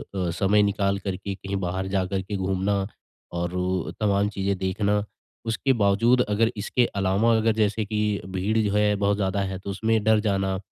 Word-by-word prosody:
अ - - -3
अ, 90 -2 0
समय 100 +4 +3
निकाल 100 -1 +1
कर 95 0 -3
के 100 +1 -5
कहीं 100 0 -5
बाहर 95 +1 -2
जाकर 95 0 -1
के 100 +2 -5
घूमना 95 +1 0 0.5
और 85 0 -2 0.5
तमाम 100 -1 +2
चीज़ें 100 -1 -2
देखना। 100 +2 0 0.4
उसके 120 +4 +1
बावजूद 115 +5 +4
अगर 110 +2 +2
इसके 120 +4 +1
अलावा, 100 +4 +2
अगर 110 0 +2
जैसे 105 0 +1
कि 105 -1 -1
भीड़ 95 +4 -1
जो 105 -2 +1
है 105 0 +3
बहुत 100 0 +1
ज़्यादा 95 0 0
है, 95 -1 -3
तो 100 - -8
उसमें 110 +2 0
डर 110 0 +4
जाना। 95 -3 0
100 Hz, 185 wpm, -25 LUFS, 95-105 Hz, 0.5 s, बावजूद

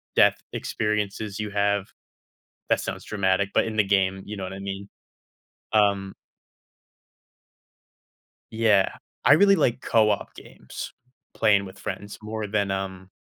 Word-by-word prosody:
death - - +5 0.2
experiences 105 -1 -2
you 105 -1 -3
have 100 -1 +1 0.8
that - - +3
sounds - - -5
dramatic, 100 -1 +1
but - - +3
in 110 - -4
the 110 - +5
game, 95 -1 +1
you 105 - -6
know 95 - -5
what 95 +1 -5
I 95 - -7
mean. 100 0 -6 0.8
Um 100 -2 +2 2.4
Yeah, 110 -4 +3 0.4
I - - +8
really 200 +5 +6
like 120 -4 +1
co-op 105 -2 +2
games, - - -9 0.4
playing 100 -3 +3
with 95 +1 -11
friends 100 +1 -6
more 110 0 -4
than, 100 -1 0
um 95 -1 -4
100 Hz, 130 wpm, -25 LUFS, 95-110 Hz, 2.4 s, I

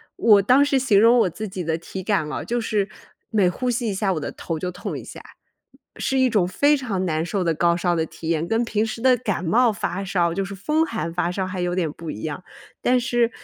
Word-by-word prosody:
我 210 -3 +5
当 255 +8 +5
时 275 -2 +2
形 230 -6 +3
容 230 +2 +6
我 190 - +3
自 215 +5 -6
己 185 -1 -5
的 160 0 -1
体 180 +3 -7
感 195 -5 0
了， 150 - -4
就 240 +1 -1
是 210 -3 -1 0.4
每 205 -5 +3
呼 250 +8 -1
吸 240 -1 -1
一 205 - -1
下 195 0 0
我 160 - -2
的 - - -4
头 165 - -5
就 180 +3 -3
痛 180 - -5
一 - - -8
下。 - - -10 0.8
是 265 - -1
一 260 -1 +4
种 210 -6 +2
非 285 +10 +3
常 215 -9 -2
难 160 -2 -1
受 190 +1 -1
的 165 - +2
高 170 +2 +2
烧 175 0 +1
的 160 -1 0
体 160 - -9
验， 165 -1 0
跟 225 +6 +1
平 220 -1 0
时 225 +1 -5
的 255 0 +5
感 210 -6 -2
冒 230 +7 +3
发 195 -2 -3
烧 175 -3 0
就 195 - -1
是 195 +1 -6
风 305 - +1
寒 220 - -4
发 175 0 0
烧 190 +1 -2
还 185 -1 -4
有 175 0 -1
点 180 -4 0
不 165 -1 -7
一 105 - -8
样。 155 +2 -4 0.4
但 250 0 +3
是， 240 -1 +1
195 Hz, 270 characters per minute, -23 LUFS, 175-230 Hz, 0.8 s, 容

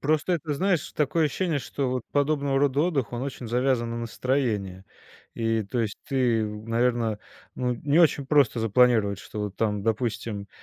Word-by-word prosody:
Просто 155 +4 +1
это, 160 -3 -1
знаешь, 175 +2 0
такое 155 +2 +2
ощущение, 155 0 -1
что 135 +1 -3
вот 125 -1 -2
подобного 140 -1 +1
рода 140 0 +2
отдых, 145 -9 0
он 120 - -3
очень 135 -3 -5
завязан 125 0 +1
на 115 - -3
настроение 115 -6 -2 0.5
и, 115 -1 0
то 110 +5 -4
есть 105 -3 -2
ты, 125 -5 +2
наверно 115 +1 -1 0.3
ну, 125 -1 -1
не 145 +7 +2
очень 145 -4 +3
просто 140 -5 +3
запланировать, 110 -3 +3
что - - -9
вот 105 -2 -4
там, 105 -2 -1
допустим, 110 -2 -2
125 Hz, 165 wpm, -26 LUFS, 110-140 Hz, 0.5 s, очень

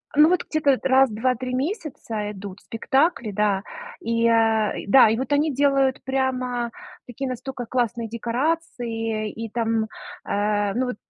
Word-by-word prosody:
Ну, 300 +1 +7
вот 360 - +2
где-то 285 -4 +2
раз 265 -1 +5
в - - -8
2-3 255 +2 -1
месяца 255 - -3
идут 200 -1 -9
спектакли, 265 0 0
да, 200 -1 +1 0.4
и, 230 0 +1
а, 225 -2 +3
да, 250 0 +7
и 225 - +1
вот 265 +3 -4
они 290 0 +2
делают 275 -1 +2
прямо 255 -3 -1 0.4
такие 260 +2 -4
настолько 255 0 -5
классные 235 -2 -1
декорации 235 -3 -2
и 225 0 -6
там, 225 -1 0 0.4
э, 205 -1 0
ну 255 +1 0
вот, 250 - -3
240 Hz, 145 wpm, -23 LUFS, 220-265 Hz, 0.4 s, Ну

